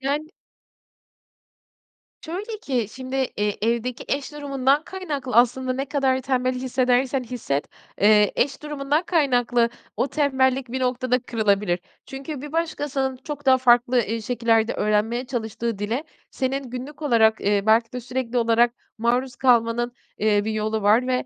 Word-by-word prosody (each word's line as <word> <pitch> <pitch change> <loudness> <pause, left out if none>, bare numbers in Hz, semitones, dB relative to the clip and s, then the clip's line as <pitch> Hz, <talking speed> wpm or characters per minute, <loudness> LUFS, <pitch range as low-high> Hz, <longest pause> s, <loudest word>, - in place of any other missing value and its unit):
Yani 290 +4 -2 1.9
Şöyle 410 +7 -5
ki 250 - -1
şimdi, 260 +1 -5
eee, 210 -6 -1
evdeki 235 +2 -1
eş 280 +1 -2
durumundan 280 0 +1
kaynaklı 295 -9 -5
aslında 255 +2 +3
ne 270 +2 -2
kadar 270 -2 +1
tembel 255 -1 0
hissedersen 255 +1 +1
hisset, 220 - -3 0.3
eee, 210 0 +5
eş 280 +3 0
durumundan 295 +1 -1
kaynaklı 245 -8 +2 0.3
o - - +1
tembellik 265 -3 +1
bir 260 - -2
noktada 250 0 +1
kırılabilir. 205 -6 0 0.3
Çünkü 270 +1 -7
bir 295 0 -8
başkasının 290 -5 -1
çok 285 +2 -8
daha 260 0 +6
farklı, 245 0 +4
eee, 225 +2 -3
şekillerde 230 -1 +1
öğrenmeye 215 +4 0
çalıştığı 230 -3 -3
dile, 230 +9 -2 0.3
senin 265 -1 -2
günlük 270 +5 -7
olarak, 220 -5 +3
eee, 205 0 +1
belki 225 +2 +3
de 250 - -4
sürekli 250 0 -2
olarak 235 +1 +3 0.2
maruz 245 +2 0
kalmanın, 240 -1 +2 0.3
eee, 205 -1 +2
bir 220 - -2
yolu 215 0 -1
var. 220 +5 +4
Ve, 255 - 0
250 Hz, 140 wpm, -23 LUFS, 230-270 Hz, 1.9 s, daha